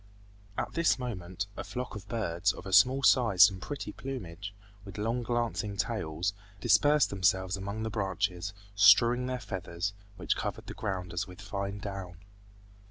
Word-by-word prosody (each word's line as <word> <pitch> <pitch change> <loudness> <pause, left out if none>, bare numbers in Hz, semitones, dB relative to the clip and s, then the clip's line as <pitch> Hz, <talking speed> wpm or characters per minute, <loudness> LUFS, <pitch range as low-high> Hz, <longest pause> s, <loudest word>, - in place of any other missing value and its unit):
At - - -2
this 170 -4 +3
moment 95 -7 -4
a - - -5
flock 125 -2 -5
of 100 -1 -8
birds, 95 -8 0
of - - -10
a 95 - -5
small 130 +8 +6
size 110 -7 +6
and 95 -1 -8
pretty 140 +11 -5
plumage, 100 -8 -6 0.3
with 100 - -10
long 115 +4 -1
glancing 115 -4 -2
tails, 95 -4 -1 0.3
dispersed 145 +7 +4
themselves 95 -1 +1
among 100 +3 -4
the 110 - -3
branches 95 -2 -1 0.2
strewing 115 +5 +6
their 130 -1 -2
feathers, 95 -2 -4 0.2
which 90 - 0
covered - - -4
the - - -7
ground 90 -3 -4
as 90 +3 -2
with 90 0 -12
fine 100 -1 -4
down. 95 -3 -6
100 Hz, 160 wpm, -30 LUFS, 95-115 Hz, 0.3 s, small